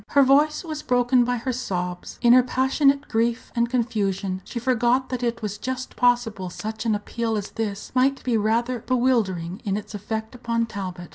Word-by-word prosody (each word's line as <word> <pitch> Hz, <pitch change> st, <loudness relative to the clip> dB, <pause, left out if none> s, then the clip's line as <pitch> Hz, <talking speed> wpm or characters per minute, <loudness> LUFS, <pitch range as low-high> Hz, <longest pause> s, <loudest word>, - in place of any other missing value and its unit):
Her 280 Hz, -, +5 dB
voice 295 Hz, +4 st, +3 dB
was 310 Hz, -3 st, -5 dB
broken 245 Hz, -1 st, +3 dB
by 245 Hz, +1 st, 0 dB
her 250 Hz, +2 st, -2 dB
sobs. 180 Hz, -7 st, -4 dB
In 240 Hz, 0 st, +7 dB
her 255 Hz, -, +8 dB
passionate 275 Hz, +3 st, +2 dB
grief 230 Hz, +1 st, -1 dB
and 235 Hz, 0 st, +1 dB
confusion 200 Hz, -6 st, -1 dB
she -, -, -8 dB
forgot 245 Hz, +1 st, +1 dB
that 255 Hz, -1 st, -3 dB
it 235 Hz, -1 st, -2 dB
was 205 Hz, -1 st, -4 dB
just 260 Hz, +1 st, -4 dB
possible 240 Hz, -6 st, +1 dB
such 220 Hz, +5 st, -5 dB
an 215 Hz, -, +3 dB
appeal 225 Hz, +2 st, -2 dB
as 205 Hz, -, -5 dB
this 210 Hz, -2 st, -4 dB
might 265 Hz, +2 st, +2 dB
be 245 Hz, -3 st, +1 dB
rather 230 Hz, +3 st, +1 dB
bewildering 220 Hz, -8 st, 0 dB
in 200 Hz, -2 st, -1 dB
its 210 Hz, -, -8 dB
effect 220 Hz, +2 st, -4 dB
upon 235 Hz, -2 st, -1 dB
Talbot. 185 Hz, -5 st, -6 dB
235 Hz, 185 wpm, -24 LUFS, 210-255 Hz, -, her